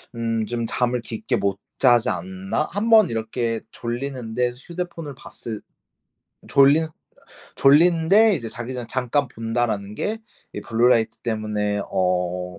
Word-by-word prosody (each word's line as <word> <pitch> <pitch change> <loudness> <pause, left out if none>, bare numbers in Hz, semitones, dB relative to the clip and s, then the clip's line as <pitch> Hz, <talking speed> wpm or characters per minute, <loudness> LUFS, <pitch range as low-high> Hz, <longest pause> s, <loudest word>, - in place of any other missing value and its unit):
음 115 -1 -1
'좀 115 0 -3
잠을 125 0 0
깊게 170 - -2
못 100 -1 -1 0.2
자지 120 -3 +4
않나?' 95 - -2
한번 215 0 +4
이렇게 115 0 -2
졸리는데 125 -1 -3
휴대폰을 170 -1 -6
봤을 110 -4 -7 0.9
졸린 140 +4 +5 0.7
졸린데 170 +8 +5
이제 115 -8 -4
자기 120 +3 -6
전 125 -2 -5
잠깐 130 +2 0
본다라는 115 -3 -2
게 215 - -2 0.3
이 - - -5
블루라이트 115 -1 +2
때문에 105 -2 -2
어 90 0 -1
120 Hz, 255 characters per minute, -23 LUFS, 110-140 Hz, 0.9 s, 졸린